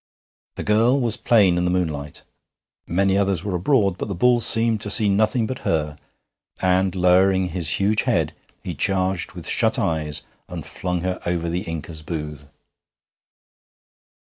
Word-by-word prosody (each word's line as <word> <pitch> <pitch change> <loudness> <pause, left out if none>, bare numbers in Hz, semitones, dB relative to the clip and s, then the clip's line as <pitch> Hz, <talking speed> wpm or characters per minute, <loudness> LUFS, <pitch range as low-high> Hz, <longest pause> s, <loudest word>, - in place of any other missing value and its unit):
The - - -5
girl 115 +6 +3
was 115 -4 0
plain 105 -7 +3
in 90 - 0
the - - +1
moonlight. 80 -5 -2 0.6
Many 95 +3 +2
others 95 -4 0
were 100 - -3
abroad, 100 0 +1
but - - -3
the 100 - -4
bull 125 +6 +3
seemed 115 -1 +1
to 105 - -3
see 105 +1 +2
nothing 110 +4 +2
but 130 +3 -5
her, 75 -2 -1 0.6
and, 95 0 +1
lowering 95 +1 +3
his 80 -3 -1
huge 105 +2 +2
head, 80 -2 0 0.3
he - - -4
charged 95 -2 -1
with - - -9
shut - - +1
eyes 75 -3 -2 0.3
and - - -6
flung 90 -1 -3
her 90 0 -2
over 85 -1 -1
the 85 +2 -2
Inca's 80 -1 -6
booth. 75 -2 -6
95 Hz, 155 wpm, -22 LUFS, 85-105 Hz, 0.6 s, girl